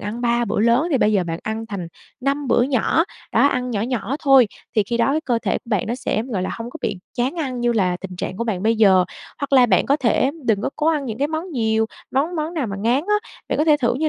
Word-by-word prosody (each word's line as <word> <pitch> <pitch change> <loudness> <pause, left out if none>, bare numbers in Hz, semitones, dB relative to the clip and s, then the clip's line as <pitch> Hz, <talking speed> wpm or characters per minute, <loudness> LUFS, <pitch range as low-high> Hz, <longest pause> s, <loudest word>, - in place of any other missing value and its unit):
ăn 210 +3 -5
3 240 0 +1
bữa 215 - -1
lớn 235 +8 +3
thì 275 - +2
bây 215 -2 +3
giờ 190 -3 +2
bạn 165 -1 -4
ăn 220 +1 -4
thành 195 -6 -5 0.3
5 275 +1 -1
bữa 240 - +4
nhỏ, 270 +5 +2 0.3
đó, - - +5
ăn 250 -3 0
nhỏ 210 -4 -1
nhỏ 240 +2 -2
thôi. 270 -5 +6 0.3
Thì 215 - +5
khi 235 +4 -3
đó 270 +6 +2
cơ 240 -4 +1
thể - - 0
của - - -42
bạn 210 -5 +1
nó 235 - -1
sẽ, 245 -3 -2
gọi 225 -7 -3
là, - - -2
hông 230 +1 -6
có - - -8
bị 200 - -2 0.2
chán 250 +4 -1
ăn 260 -6 -3
như 240 0 +2
là 185 -5 +1
tình 185 -2 -7
trạng 185 - -4
của 235 - -2
bạn 200 -5 -2
bây 225 +1 +2
giờ. 190 -4 +5 0.4
Hoặc 280 -1 -4
là 255 -2 +7
bạn 190 -6 +3
có 280 - +3
thể 260 0 +2 0.2
đừng 210 -2 +2
có - - -1
cố 305 - -1
ăn 310 -3 +2
những 225 -3 -5
cái 285 +2 +1
món 320 +4 -4
nhiều, 220 -5 +1 0.2
món 310 +6 0
món 315 +3 -3
nào 300 -7 -1
mà 195 -2 -5
ngán 235 +5 +2
á. 420 0 0 0.2
Bạn - - -1
có 300 - +3
thể 305 -2 +5
thử 245 -5 +1
như 310 +4 0
240 Hz, 280 wpm, -21 LUFS, 215-275 Hz, 0.4 s, là